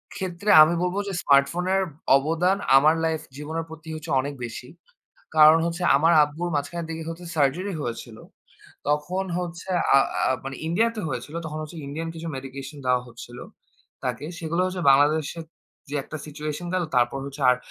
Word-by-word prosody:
ক্ষেত্রে, 190 +1 -4
আমি 160 +2 +2
বলব 180 +1 -1
যে, - - -4
স্মার্টফোনের 175 +7 +3 0.4
অবদান 165 +7 +1 0.2
আমার 155 +4 +5
লাইফ 160 -1 -1 0.2
জীবনের 160 +2 -4
প্রতি 160 0 -11
হচ্ছে, 155 +1 -7
অনেক 140 +2 -5
বেশি। 120 +2 -8 0.7
কারণ 155 +1 +8
হচ্ছে, 170 +1 -4
আমার 160 +4 +4
আব্বুর 160 +4 -4
মাঝখানের 160 +4 -3
দিকে 165 0 -5
হচ্ছে 170 +1 -8
সার্জারি 165 +7 +1
হয়েছিল। 115 -2 -6 0.7
তখন 150 +6 0
হচ্ছে, 175 +1 -6 0.3
আ - - +8 0.3
আ - - +1
মানে 135 0 -5
ইন্ডিয়াতে 225 +6 +1
হয়েছিল, 130 +3 -5
তখন 155 0 -5
হচ্ছে 155 +2 -9
ইন্ডিয়ান 160 +4 -5
কিছু 165 +1 -7
মেডিকেশন 135 +2 -8
দেওয়া 125 0 +3
হচ্ছিল, 120 +1 -11 0.7
তাকে। - - -3
সেগুলো 170 +2 -2
হচ্ছে 185 -1 -4
বাংলাদেশে 145 +4 +3 0.5
যে - - -5
একটা 155 - -7
সিচুয়েশন 150 +3 -5
গেল, 185 - +1
তারপর 125 +2 +2
হচ্ছে 140 +1 -9
আর 125 - +3
155 Hz, 160 wpm, -24 LUFS, 140-175 Hz, 0.7 s, কারণ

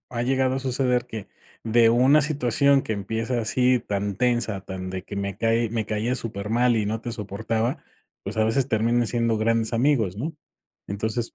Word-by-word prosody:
ha 115 - 0
llegado 130 0 +1
a - - -1
suceder 125 -1 0
que 110 -5 -7 0.4
de 115 0 +4
una 130 +6 +5
situación 140 -1 +2
que 110 - -3
empieza 115 +4 -2
así 125 +3 +2
tan 100 -2 -3
tensa, 120 -3 0
tan 95 -1 -6
de 95 0 -5
que 100 - -8
me 100 0 -3
cae 115 0 +1
me 110 -1 -2
caías 110 +5 -1
súper 105 -3 -5
mal 120 +1 +3
y 105 -2 0
no 110 +1 -2
te 120 - -5
soportaba, 110 +2 -2 0.4
pues, 100 +3 -5
a 110 - +4
veces 125 +4 +1
terminan 120 +1 +2
siendo 115 -1 0
grandes 115 0 +1
amigos, 115 -6 +1
¿no? 155 +9 -3 0.5
Entonces 110 +4 -3
115 Hz, 185 wpm, -24 LUFS, 105-125 Hz, 0.5 s, una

